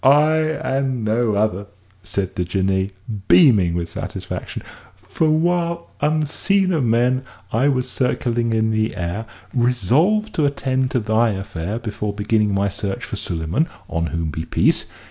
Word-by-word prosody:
"I, 150 +4 +5
and 135 -6 -1
no 110 0 +1
other," 100 -1 0 0.4
said 95 +2 -3
the 90 - 0
Jinnee, 95 +2 0 0.4
beaming 105 - +5
with 85 -1 -2
satisfaction; 80 - -6 0.3
"for 160 - -1
while, 170 +1 0
unseen 155 +6 +1
of 155 -5 +1
men, 120 +3 +2 0.3
I 125 +6 +3
was 130 -3 +1
circling 120 -2 0
in 110 0 +1 0.2
air, 90 +6 -3 0.3
resolved 130 - +2
to 155 - +1
attend 130 -2 0
to 125 - 0
thy 110 +1 +2
affair 95 0 -4
before 105 -3 -4
beginning 105 0 +1
my 100 0 +1
search 100 0 -4
for - - -5
Suleyman 85 - -1 0.2
(on 85 0 -1
whom 80 -2 -2
be 80 +2 -4
peace!) - - +2
115 Hz, 145 wpm, -21 LUFS, 100-140 Hz, 0.4 s, I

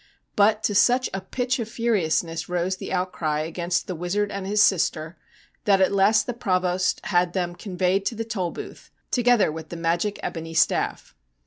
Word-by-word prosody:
But 210 +1 +3
to 210 - +1
such 245 +5 +3
a 195 - -3
pitch 250 +6 -2
of 225 -2 -4
furiousness 165 -8 -1
rose 180 +1 -1
the - - -7
outcry 180 -5 -1
against 170 +2 -2
the 185 - -4
wizard 185 +5 -2
and 195 -1 -5
his 210 +1 0
sister 165 -4 +2 0.5
that 195 -2 +4
at 190 - +3
last 200 +3 +4
the 245 - -3
Provost 185 -5 0
had 175 -2 +1
them 175 -2 -1
con 185 0 -8
veyed 185 +2 +2
to 230 - -1
the 225 +1 -4
Tolbooth, 190 -6 -5 0.2
together 245 -7 +3
with 160 0 -8
the 170 - -6
magic 170 +5 -1
ebony 165 -1 -5
staff. - - +1
185 Hz, 180 wpm, -24 LUFS, 175-210 Hz, 0.5 s, that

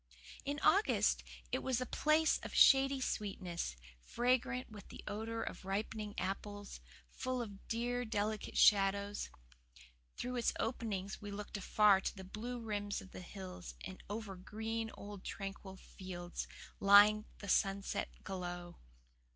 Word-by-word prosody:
In 285 +1 -1
August 395 +6 +4 0.3
it - - 0
was 255 -2 +1
a 255 - -1
place 310 +4 +3
of - - -7
shady 270 0 +7
sweetness, 185 - -2 0.2
fragrant 250 - 0
with 205 -2 -10
the - - -10
odour 225 +2 -3
of - - -6
ripening 205 +2 -3
apples, 205 +2 -4 0.3
full 255 -1 -2
of 205 -4 -7
dear, 245 +2 0
delicate 215 -1 -2
shadows. 200 0 +4 0.9
Through 250 0 -3
its 240 - +2
openings 205 -5 -2
we 205 - -6
looked 205 +1 -6
afar 200 0 +5
to - - -2
the 190 - -8
blue 230 +6 -5
rims 205 -3 -2
of 190 - -11
the - - -8
hills 185 -1 -8
and 190 0 -8
over 210 -2 -4
green, 220 +4 -3
old, 200 -1 -8
tranquil 195 -1 -6
fields, 175 -2 -6 0.3
lying 205 +2 +8
the 200 - -8
sunset 195 0 +1
glow. 175 -2 -5
205 Hz, 135 wpm, -36 LUFS, 195-230 Hz, 0.9 s, lying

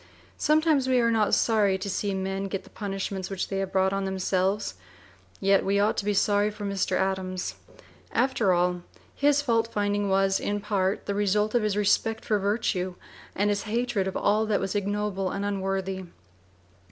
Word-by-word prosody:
Sometimes 305 -3 +3
we 255 -1 +3
are 230 -1 +3
not 220 -2 +3
sorry 210 -4 +2
to 190 - -5
see 200 0 -1
men 195 +1 -2
get 195 0 -4
the - - -18
punishments 195 -2 -4
which 195 -1 -3
they 195 - -2
have 195 -1 -3
brought 190 0 +2
on 195 0 -1
themselves; 190 - 0 0.7
yet 195 0 +3
we 200 +1 +1
ought 210 +2 +2
to 200 - -1
be 205 - +1
sorry 205 +1 +3
for 210 -1 -7
Mr. 200 -1 0
Adams. 190 -1 -2 0.6
After 240 -6 +2
all, 180 0 +1 0.3
his 290 0 +2
fault 230 -3 +1
finding 205 -1 0
was 195 0 +2
in 205 0 -2
part 200 -2 -1
the 200 - -2
result 210 +1 +1
of 240 - +3
his 210 -1 0
respect 220 +2 +1
for 210 -2 +1
virtue 195 -3 -1 0.4
and 205 +2 +2
his 205 -1 0
hatred 230 -4 0
of 190 - -3
all 215 +2 +2
that 210 -2 +1
was 195 -1 -2
ignoble 205 -1 -1
and 200 +1 -3
unworthy. 195 -1 -2
200 Hz, 180 wpm, -26 LUFS, 190-210 Hz, 0.7 s, Sometimes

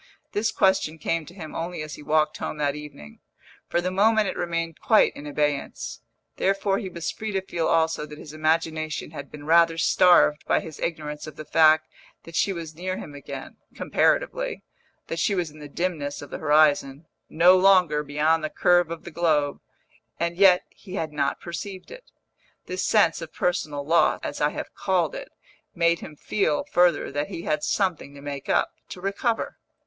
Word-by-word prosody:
This 220 +2 0
question 190 -5 +2
came 165 -1 -2
to 175 - -12
him 160 -5 -8
only 165 -1 -4
as 155 -1 -8
he - - -9
walked 155 +1 +1
home - - -4
that 145 -1 0
evening; 145 - -10 0.5
for 175 - 0
the 185 +1 -2
moment 215 +2 +3
it - - -3
remained 165 -2 -3
quite 220 - +4
in 145 - -8
abeyance: 145 -1 -2 0.4
therefore 195 0 +1
he 190 - -5
was 170 -2 -4
free 220 0 -5
to 195 - +1
feel 170 -3 -2
also 160 -2 +1
that 150 0 -10
his 150 -1 -10
imagination 155 -1 -1
had 140 -3 -8
been 145 -1 -10
rather 165 +1 +4
starved 165 -3 +4
by - - +3
his 160 -2 -9
ignorance 150 -2 -4
of 155 - -9
the 155 - -8
fact 155 0 +5 0.4
that 165 - -11
she 200 - +2
was 165 -4 -6
near 185 +3 -4
him 145 - -8
again 145 - -8 0.2
(comparatively), - - 0 0.4
that - - -4
she 205 - +1
was 175 -4 -2
in 155 - -15
the 145 -1 -9
dimness 150 -4 -3
of 145 - -12
the - - -5
horizon 150 -1 +3 0.2
(no 175 +3 +6
longer 185 -5 +4
beyond 150 +2 +1
the 155 - -1
curve 175 0 +3
of 170 -1 -6
the 175 - -9
globe), 155 -4 +1 0.6
and 170 0 -1
yet 185 -1 +6
he 190 -2 -10
had 160 -6 -3
not 140 -1 -1
perceived 185 +2 -7
it. - - -12 0.6
This 185 0 -3
sense 190 -6 +3
of 160 -1 -7
personal 150 -5 -2
loss, 165 +3 +3
as - - -5
I - - +4
have - - -7
called - - 0
it, - - -7 0.5
made 170 -1 +2
him 150 - -10
feel, 170 0 0
further, 175 -6 +3
that 145 +1 -2
he 165 - -7
had 150 -1 -1
something 175 -7 -1
to 140 - -11
make 140 -1 -6
up, - - +2 0.2
to - - -8
recover. 200 +5 -2
165 Hz, 190 wpm, -25 LUFS, 150-185 Hz, 0.6 s, no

